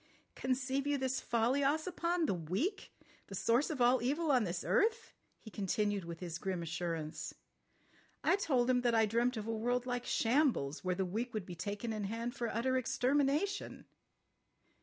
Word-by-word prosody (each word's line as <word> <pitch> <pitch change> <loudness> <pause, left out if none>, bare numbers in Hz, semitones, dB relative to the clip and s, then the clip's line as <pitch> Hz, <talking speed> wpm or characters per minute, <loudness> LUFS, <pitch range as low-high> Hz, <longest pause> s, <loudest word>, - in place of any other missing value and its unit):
"Conceive 260 +2 -1
you 290 0 +2
this 265 0 -1
folly, 240 +4 +1
Ossipon? 335 +3 +1
The 270 - +1
weak! 190 - -2 0.4
The 195 - -7
source 235 +8 +2
of 295 -5 -3
all 245 0 +5
evil 295 +6 +1
on 250 -5 +4
this 175 -1 -3
earth!" 455 +2 +2 0.2
he 220 - -12
continued 205 -1 -1
with 170 0 -7
his 170 -2 -4
grim 185 -3 -2
assurance. 160 -1 -4 0.9
"I - - +4
told 265 -11 +1
him 250 -1 +3
that 240 -1 +2
I 225 -1 +5
dreamt 235 +3 +1
of 215 - -4
a 225 0 -2
world 245 +3 0
like 245 -1 -3
shambles, 230 - +1
where 180 -1 0
the 190 +1 0
weak 225 +6 -3
would 210 -4 -2
be 180 - -7
taken 205 +6 -4
in 210 -2 -3
hand 230 +4 -3
for 240 -3 -2
utter 260 +4 +1
extermination." 285 - 0
240 Hz, 175 wpm, -34 LUFS, 200-270 Hz, 0.9 s, all